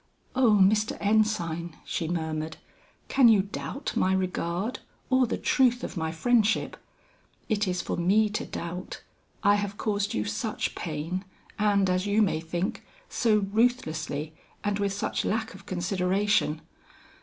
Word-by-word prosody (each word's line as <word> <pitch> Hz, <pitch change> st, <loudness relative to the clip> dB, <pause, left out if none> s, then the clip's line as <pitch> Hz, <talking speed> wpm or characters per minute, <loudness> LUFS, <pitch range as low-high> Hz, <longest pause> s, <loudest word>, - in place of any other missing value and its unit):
"Oh 240 Hz, -5 st, +5 dB
Mr. 210 Hz, +3 st, +3 dB
Ensign," 175 Hz, -6 st, +1 dB
she 165 Hz, -, -2 dB
murmured, 160 Hz, -2 st, -3 dB, 0.5 s
"can 265 Hz, -3 st, +5 dB
you 205 Hz, -4 st, +5 dB
doubt 235 Hz, +7 st, -5 dB
my 190 Hz, -, +2 dB
regard 185 Hz, +3 st, -2 dB, 0.3 s
or 260 Hz, -1 st, +4 dB
the -, -, -2 dB
truth 250 Hz, -2 st, +2 dB
of -, -, -5 dB
my 160 Hz, -2 st, -2 dB
friendship? 225 Hz, +5 st, +2 dB, 0.7 s
It 215 Hz, -2 st, +1 dB
is 180 Hz, -1 st, -1 dB
for -, -, -3 dB
me 200 Hz, +5 st, +3 dB
to 210 Hz, -, -2 dB
doubt; 180 Hz, +2 st, -6 dB, 0.4 s
I 205 Hz, -, +6 dB
have 205 Hz, 0 st, -3 dB
caused 205 Hz, -2 st, -1 dB
you 105 Hz, -1 st, 0 dB
such 105 Hz, 0 st, -2 dB
pain, 180 Hz, +6 st, -4 dB, 0.4 s
and 200 Hz, -2 st, +3 dB
as 185 Hz, +2 st, 0 dB
you 210 Hz, +2 st, +4 dB
may 170 Hz, -5 st, +1 dB
think, 170 Hz, +4 st, -3 dB, 0.3 s
so 215 Hz, -4 st, +2 dB
ruthlessly 160 Hz, -, 0 dB, 0.3 s
and 205 Hz, 0 st, 0 dB
with 200 Hz, -1 st, 0 dB
such 200 Hz, -, -2 dB
lack 220 Hz, +1 st, -1 dB
of 195 Hz, +1 st, -14 dB
consideration. 185 Hz, -2 st, +1 dB
195 Hz, 145 wpm, -27 LUFS, 170-215 Hz, 0.7 s, I